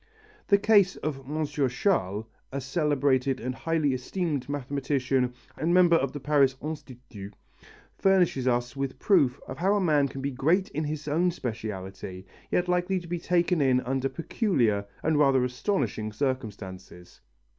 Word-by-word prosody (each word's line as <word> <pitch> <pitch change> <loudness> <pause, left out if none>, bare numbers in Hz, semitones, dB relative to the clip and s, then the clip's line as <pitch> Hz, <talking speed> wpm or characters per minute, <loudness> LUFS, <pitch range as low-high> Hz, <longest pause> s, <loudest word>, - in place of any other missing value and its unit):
The 200 - +5
case 200 -2 +4
of 135 -3 -5
M. 155 +1 -1
Chasles, 125 - 0 0.3
a 140 - -3
celebrated 135 -2 +1
and 125 +2 -3
highly 155 -1 0
esteemed 140 +1 -3
mathematician 135 -2 -1 0.2
and 170 +3 +1
member 175 -2 +6
of 135 -5 +1
the 145 - -6
Paris 140 -2 +3
Institut, 125 -9 -8 0.6
furnishes 180 -9 +3
us 120 0 0
with 135 -1 -3
proof 145 -11 +3
of - - -7
how 195 +4 +3
a - - +2
man 150 -6 +3
can 135 0 -7
be 140 - -1
great 160 +9 +1
in 155 +2 -3
his 150 0 -4
own 165 +5 +2
speciality, 95 - -6 0.2
yet 180 - +1
likely 180 +1 +1
to 175 - -11
be 175 0 -3
taken 175 -1 +1
in 130 -2 +4
under 135 +1 -1
peculiar 130 - 0 0.2
and 155 -1 +2
rather 135 -3 +4
astonishing 125 - -1
circumstances. 105 -8 -5
140 Hz, 150 wpm, -27 LUFS, 125-165 Hz, 0.6 s, member